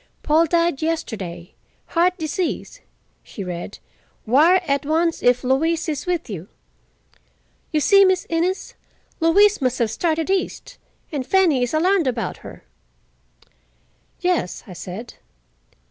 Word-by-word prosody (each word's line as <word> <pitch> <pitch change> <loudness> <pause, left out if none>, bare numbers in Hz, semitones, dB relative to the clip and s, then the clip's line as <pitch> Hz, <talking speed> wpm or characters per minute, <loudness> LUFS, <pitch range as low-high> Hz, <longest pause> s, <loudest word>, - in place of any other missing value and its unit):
"'Paul 320 +2 +3
died 335 -3 +1
yesterday. 200 - -4 0.4
Heart 350 +2 +2
disease,'" 325 +2 -3 0.4
she 200 - -8
read. 175 -2 -6 0.5
"'Wire 310 +11 +5
at 280 -2 0
once 325 +3 0
if 245 0 +3
Louise 315 +7 +1
is 300 +1 -3
with 350 -3 -1
you.' 190 -4 -7 1.2
You 305 - +1
see, 395 +5 +6
Miss 375 -1 +2
Innes, 345 +3 -1 0.5
Louise 395 +4 +4
must 255 -1 0
have 230 -3 0
started 325 +7 -1
east, 390 -1 -3 0.3
and 285 -4 -2
Fanny 330 -3 +3
is 245 - 0
alarmed 355 0 +2
about 240 -2 -2
her." - - -12 1.6
"Yes," 355 - -1
I 185 - -10
said. 190 +7 -8
315 Hz, 125 wpm, -21 LUFS, 245-345 Hz, 1.6 s, see